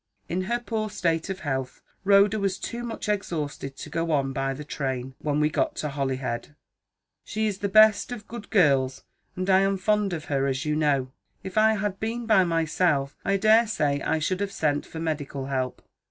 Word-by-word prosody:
In 185 Hz, +2 st, -2 dB
her 240 Hz, +4 st, 0 dB
poor 220 Hz, -3 st, -3 dB
state 165 Hz, -2 st, -1 dB
of 190 Hz, 0 st, -4 dB
health, 135 Hz, -3 st, -3 dB, 0.2 s
Rhoda 200 Hz, +1 st, +5 dB
was 195 Hz, -2 st, 0 dB
too 235 Hz, -, -5 dB
much 230 Hz, -3 st, -5 dB
exhausted 150 Hz, -9 st, -3 dB
to -, -, -8 dB
go 165 Hz, 0 st, -1 dB
on 135 Hz, -3 st, +1 dB
by 135 Hz, 0 st, -1 dB
the 150 Hz, -, -7 dB
train, 130 Hz, -3 st, -3 dB
when 150 Hz, -1 st, -1 dB
we 150 Hz, -, +4 dB
got 155 Hz, -, 0 dB
to 150 Hz, -, -3 dB
Holyhead. 135 Hz, -1 st, -3 dB, 0.7 s
She 220 Hz, +1 st, -2 dB
is 205 Hz, -2 st, -2 dB
the 200 Hz, -, -1 dB
best 215 Hz, +2 st, +5 dB
of 225 Hz, -4 st, -7 dB
good 235 Hz, -2 st, -8 dB
girls, 135 Hz, -8 st, +3 dB, 0.3 s
and 185 Hz, 0 st, -3 dB
I 190 Hz, -1 st, +5 dB
am 195 Hz, 0 st, +2 dB
fond 210 Hz, +1 st, +1 dB
of 160 Hz, -2 st, -4 dB
her, 140 Hz, -1 st, 0 dB
as 135 Hz, +2 st, -2 dB
you 150 Hz, 0 st, 0 dB
know. 140 Hz, -4 st, +1 dB, 0.3 s
If 190 Hz, -, -7 dB
I 220 Hz, 0 st, +5 dB
had 205 Hz, -1 st, -2 dB
been 230 Hz, +2 st, -3 dB
by 215 Hz, -4 st, +5 dB
myself, 160 Hz, -4 st, +1 dB
I 195 Hz, 0 st, +2 dB
daresay 215 Hz, -9 st, +3 dB
I 160 Hz, -, 0 dB
should 180 Hz, +4 st, -1 dB
have 200 Hz, -1 st, -2 dB
sent 145 Hz, -6 st, 0 dB
for 160 Hz, -, -7 dB
medical 145 Hz, -4 st, -3 dB
help. 130 Hz, -2 st, -3 dB
165 Hz, 195 wpm, -26 LUFS, 140-205 Hz, 0.7 s, Rhoda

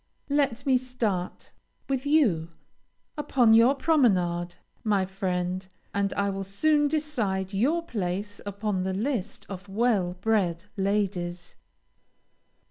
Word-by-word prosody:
Let 280 Hz, -2 st, +1 dB
me 265 Hz, -2 st, +4 dB
start 230 Hz, -8 st, -3 dB, 0.4 s
with 270 Hz, 0 st, -1 dB
you 215 Hz, -, +3 dB, 0.7 s
upon 245 Hz, -6 st, +4 dB
your 235 Hz, +5 st, +6 dB
promenade, 180 Hz, -, +2 dB, 0.3 s
my 205 Hz, -3 st, +2 dB
friend, 185 Hz, -1 st, -2 dB, 0.3 s
and 200 Hz, -1 st, 0 dB
I 200 Hz, 0 st, 0 dB
will 195 Hz, 0 st, -4 dB
soon 295 Hz, +10 st, +2 dB
decide 230 Hz, -11 st, -1 dB
your 290 Hz, +12 st, +1 dB
place 205 Hz, -, -3 dB
upon 205 Hz, -1 st, -2 dB
the 190 Hz, 0 st, -2 dB
list 225 Hz, -1 st, -2 dB
of 195 Hz, 0 st, -8 dB
well 200 Hz, -4 st, +1 dB
bred 190 Hz, -5 st, +1 dB
ladies. 190 Hz, -3 st, -1 dB
200 Hz, 115 wpm, -27 LUFS, 185-255 Hz, 0.7 s, your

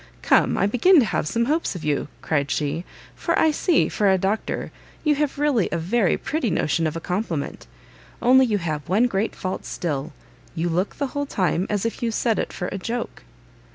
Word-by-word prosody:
"Come, -, -, +3 dB
I -, -, +3 dB
begin 250 Hz, -, +5 dB
to 265 Hz, -, +6 dB
have 180 Hz, -, -1 dB
some 235 Hz, +7 st, +1 dB
hopes 310 Hz, -, 0 dB
of 180 Hz, -, -6 dB
you," 145 Hz, -2 st, 0 dB, 0.2 s
cried 145 Hz, -3 st, 0 dB
she, 150 Hz, +4 st, -1 dB, 0.3 s
"for -, -, -1 dB
I 320 Hz, -, +4 dB
see, 325 Hz, +1 st, +2 dB
for 205 Hz, -2 st, +1 dB
a 190 Hz, -, +4 dB
Doctor, 195 Hz, +4 st, -2 dB, 0.3 s
you 300 Hz, -2 st, +3 dB
have 295 Hz, -1 st, -1 dB
really 280 Hz, -8 st, +2 dB
a -, -, 0 dB
very 185 Hz, +4 st, +1 dB
pretty 290 Hz, -6 st, -2 dB
notion 165 Hz, -1 st, +1 dB
of 155 Hz, -, -4 dB
a -, -, -2 dB
compliment: 180 Hz, -4 st, -3 dB, 0.5 s
only 260 Hz, +1 st, +5 dB
you 210 Hz, -3 st, +1 dB
have 155 Hz, -5 st, -4 dB
one 210 Hz, +7 st, +4 dB
great 215 Hz, -2 st, -1 dB
fault 185 Hz, 0 st, -4 dB
still; 150 Hz, -5 st, -3 dB, 0.4 s
you 170 Hz, +1 st, -1 dB
look 180 Hz, +4 st, -1 dB
the 285 Hz, -, -1 dB
whole 285 Hz, 0 st, -2 dB
time 185 Hz, -, 0 dB
as 205 Hz, 0 st, -1 dB
if 230 Hz, -, -3 dB
you 235 Hz, -, +1 dB
said 225 Hz, 0 st, 0 dB
it -, -, -2 dB
for 180 Hz, -, -4 dB
a 195 Hz, -, -5 dB
joke." 235 Hz, +5 st, -4 dB
200 Hz, 205 wpm, -23 LUFS, 170-245 Hz, 0.5 s, to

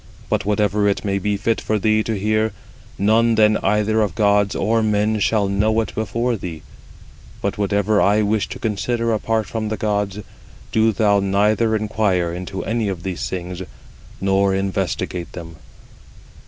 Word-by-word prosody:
But -, -, 0 dB
whatever 105 Hz, 0 st, +1 dB
it 100 Hz, +1 st, 0 dB
may 100 Hz, -1 st, 0 dB
be 105 Hz, +1 st, -1 dB
fit 110 Hz, +2 st, 0 dB
for 110 Hz, -, 0 dB
thee 110 Hz, +1 st, +2 dB
to 110 Hz, -2 st, -1 dB
hear, 110 Hz, +1 st, 0 dB, 0.4 s
none 115 Hz, +3 st, +3 dB
then 110 Hz, 0 st, +4 dB
either 105 Hz, +2 st, +1 dB
of 100 Hz, -6 st, -1 dB
gods 100 Hz, -2 st, +2 dB
or 115 Hz, +1 st, +1 dB
men 105 Hz, 0 st, +1 dB
shall 105 Hz, 0 st, +2 dB
know 105 Hz, +3 st, +1 dB
it 110 Hz, -, -5 dB
before 115 Hz, +3 st, -1 dB
thee: 85 Hz, -6 st, -7 dB, 0.8 s
but -, -, -3 dB
whatever 100 Hz, +1 st, +2 dB
I 105 Hz, +2 st, +3 dB
wish 105 Hz, 0 st, 0 dB
to -, -, -6 dB
consider 115 Hz, +2 st, -1 dB
apart 110 Hz, 0 st, 0 dB
from 110 Hz, +1 st, -3 dB
the 110 Hz, -, -2 dB
gods, 105 Hz, -2 st, -1 dB, 0.5 s
do 110 Hz, 0 st, +3 dB
thou 105 Hz, -1 st, +2 dB
neither 105 Hz, +3 st, +2 dB
inquire 105 Hz, -5 st, 0 dB
into 90 Hz, +2 st, -5 dB
any 115 Hz, -1 st, -1 dB
of 90 Hz, -3 st, -5 dB
these 95 Hz, -2 st, -3 dB
things, 90 Hz, 0 st, -5 dB, 0.6 s
nor 95 Hz, 0 st, +2 dB
investigate 95 Hz, -2 st, -2 dB
them." 85 Hz, -2 st, -9 dB
105 Hz, 160 wpm, -20 LUFS, 100-110 Hz, 0.8 s, then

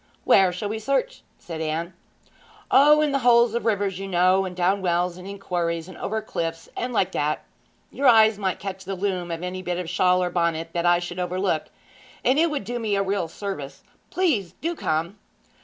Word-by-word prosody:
'Where 190 Hz, -2 st, +5 dB
shall 190 Hz, +4 st, -4 dB
we 220 Hz, +1 st, -3 dB
search?' 275 Hz, -, -1 dB, 0.2 s
said 165 Hz, -2 st, -7 dB
Anne. 160 Hz, +3 st, -3 dB, 0.8 s
'O, 300 Hz, +2 st, +6 dB
in 300 Hz, -1 st, +1 dB
the 275 Hz, -, +1 dB
holes 235 Hz, -2 st, +4 dB
of 235 Hz, 0 st, -1 dB
rivers, 200 Hz, -3 st, 0 dB
you 195 Hz, -, -5 dB
know, 185 Hz, +1 st, +3 dB
and 180 Hz, -1 st, -6 dB
down 185 Hz, +2 st, +1 dB
wells, 175 Hz, -1 st, 0 dB
and 180 Hz, +1 st, -10 dB
in 200 Hz, 0 st, -7 dB
quarries, 170 Hz, -3 st, -2 dB
and 185 Hz, -, -11 dB
over 220 Hz, +1 st, -3 dB
cliffs, 165 Hz, -5 st, -4 dB
and 250 Hz, -, -3 dB
like 190 Hz, -5 st, +1 dB
that. 150 Hz, -2 st, -1 dB, 0.5 s
Your 280 Hz, -, +1 dB
eyes 220 Hz, -3 st, +6 dB
might 190 Hz, -2 st, -1 dB
catch 195 Hz, -1 st, -6 dB
the 195 Hz, +1 st, -4 dB
loom 185 Hz, -2 st, -2 dB
of 165 Hz, 0 st, -4 dB
any 185 Hz, +1 st, -4 dB
bit 180 Hz, -1 st, -3 dB
of 180 Hz, -, -3 dB
a -, -, -10 dB
shawl 180 Hz, +2 st, +2 dB
or 180 Hz, -, -2 dB
bonnet 170 Hz, -2 st, 0 dB
that 175 Hz, 0 st, 0 dB
I 175 Hz, 0 st, +5 dB
should 175 Hz, +1 st, -5 dB
overlook, 180 Hz, -2 st, -1 dB, 0.6 s
and 265 Hz, +4 st, +4 dB
it 335 Hz, +1 st, +4 dB
would 295 Hz, -7 st, -3 dB
do 240 Hz, +4 st, -4 dB
me 215 Hz, -3 st, 0 dB
a 195 Hz, -, +1 dB
real 195 Hz, -3 st, -1 dB
service. 160 Hz, -6 st, -6 dB, 0.3 s
Please 280 Hz, -, 0 dB
do 340 Hz, +2 st, -4 dB
come!' 165 Hz, -, -2 dB
190 Hz, 210 wpm, -24 LUFS, 175-220 Hz, 0.8 s, O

